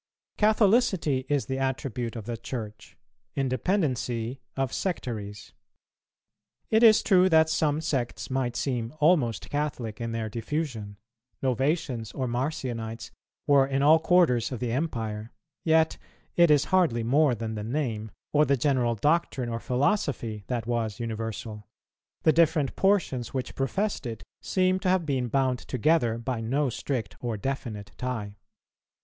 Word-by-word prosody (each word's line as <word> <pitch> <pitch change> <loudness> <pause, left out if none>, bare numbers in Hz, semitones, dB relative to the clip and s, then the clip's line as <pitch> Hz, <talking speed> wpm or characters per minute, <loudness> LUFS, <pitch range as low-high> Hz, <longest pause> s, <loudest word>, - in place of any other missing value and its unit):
Catholicity 205 - +3
is 145 -2 +1
the 130 0 -3
attribute 125 -3 -2
of 110 -3 -6
the 120 0 -3
Church, 110 -3 -7 0.4
independency 130 - -1 0.2
of 135 -2 -1
sectaries. 110 - -4 1.2
It 220 0 +4
is 225 -2 +7
true 185 -2 +5
that 160 -1 +5
some 155 -1 +1
sects 135 -6 -2
might 130 -2 -1
seem 120 -1 -2
almost 150 - +2
Catholic 130 -7 -3
in 115 0 -3
their 115 -1 -2
diffusion; 115 -3 -4 0.5
Novatians 130 - -1
or 130 -2 -1
Marcionites 120 -3 -3 0.3
were 140 -2 +5
in 135 0 0
all 155 +3 +7
quarters 160 -9 +3
of 125 - -4
the 120 -1 -2
empire; 115 -6 -3 0.3
yet 160 0 +3 0.4
it 170 -1 +5
is 150 -1 +4
hardly 160 -12 +3
more 135 +2 +3
than 110 0 -4
the 105 -1 -4
name, 115 -3 -2 0.2
or 150 0 +5
the 140 -2 +2
general 125 -3 +1
doctrine 145 -1 +1
or 115 0 -3
philosophy, 125 - -1
that 120 -3 -2
was 115 -4 -2
universal: 110 -2 -5 0.6
the 155 - +5
different 160 -3 +2
portions 175 - +1
which 130 - -3
professed 190 +2 -1
it 115 -2 -6 0.2
seem 185 0 +1
to 185 - 0
have 185 -2 +2
been 130 -4 0
bound 130 0 +1
together 125 -2 +1
by 115 0 -3
no 130 +4 0
strict 120 -4 -3
or 120 -3 -3
definite 115 -4 -4
tie. 115 -5 -4
130 Hz, 140 wpm, -27 LUFS, 115-155 Hz, 1.2 s, is